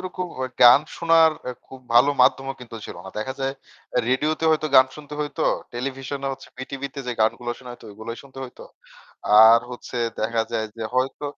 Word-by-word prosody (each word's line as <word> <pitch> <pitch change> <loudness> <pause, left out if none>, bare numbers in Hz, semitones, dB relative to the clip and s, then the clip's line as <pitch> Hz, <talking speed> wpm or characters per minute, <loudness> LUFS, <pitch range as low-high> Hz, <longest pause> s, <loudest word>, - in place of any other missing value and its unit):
ওরকম 185 0 -5
ও - - -1 0.2
গান 120 +3 +9 0.2
শোনার 165 -1 +5 0.2
আ - - -1 0.2
খুব 130 - -12
ভালো 125 +4 +6
মাধ্যমও 135 +1 +2
কিন্তু 115 -2 -9
ছিল - - -9
না। 95 - -8
দেখা 130 +5 -4
যায় 135 0 -1 0.6
রেডিওতে 150 +5 0
হয়তো 155 0 +1
গান 130 0 +8
শুনতে 150 -1 -10
হইত। 145 -1 -5 0.4
টেলিভিশনে 135 +2 -4
হচ্ছে 135 0 -10
বিটিভিতে 135 +1 -6
যে 125 - -2
গানগুলো 120 +2 0
শুনা 125 -1 -11
হইতো 120 - -14
ঐগুলাই 110 +3 -7
শুনতে 135 -1 -14
হইত। 125 - -13 0.9
আর 115 +1 +7
হচ্ছে 125 0 -8 0.2
দেখা 115 +1 0
যায় 110 -1 -1
যে 115 - -6
হয়তো 130 +3 -1
130 Hz, 180 wpm, -23 LUFS, 120-140 Hz, 0.9 s, গান